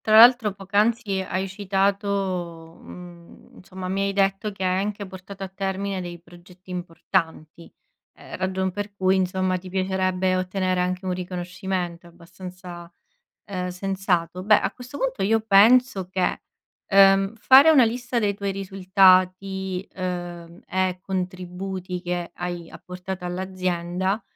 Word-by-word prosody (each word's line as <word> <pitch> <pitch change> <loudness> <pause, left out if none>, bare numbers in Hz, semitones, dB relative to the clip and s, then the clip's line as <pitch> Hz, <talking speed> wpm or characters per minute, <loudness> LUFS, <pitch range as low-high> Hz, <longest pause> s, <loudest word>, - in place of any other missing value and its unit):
Tra 215 0 +3
l'altro 235 -3 +7
poc'anzi 205 +1 0
hai 190 +1 -3
citato, 195 -4 -2
mhmm, 175 -1 -13
insomma 185 0 -8
mi 195 +1 -1
hai 200 0 0
detto 195 +2 0
che 195 - -8
hai 185 0 +1
anche 205 -1 -4
portato 190 +1 -10
a 190 - -4
termine 195 0 -3
dei 175 -1 -7
progetti 175 +2 -17
importanti, 170 -2 -3 0.4
ehm, - - -9
ragion 190 0 -1
per 205 +1 -6
cui 190 -1 +2
insomma 185 0 0
ti 185 - -11
piacerebbe 185 -1 0
ottenere 185 0 -1
anche 180 +1 -2
un 185 - -1
riconoscimento, 180 -1 -4
è - - -14
abbastanza, 175 0 -11 0.5
ehm, 185 -2 -4
sensato. 180 -2 -1
Beh, 210 +1 +5
a 195 - -1
questo 250 +3 -10
punto 260 -6 -1
io 225 +3 +3
penso 220 -1 +4
che, 185 -1 -1 0.5
ehm, 195 +1 +5
fare 265 +7 +7
una 270 -6 +7
lista 245 +2 -2
dei 205 -3 +1
tuoi 200 -1 -3
risultati, 190 0 +2
ehm, 175 -2 -6
e 185 -1 -1
contributi 185 0 -5
che 175 -1 -3
hai 175 -1 -5
apportato 180 0 -8
all'azienda, 185 +1 -2
185 Hz, 135 wpm, -24 LUFS, 180-195 Hz, 0.5 s, l'altro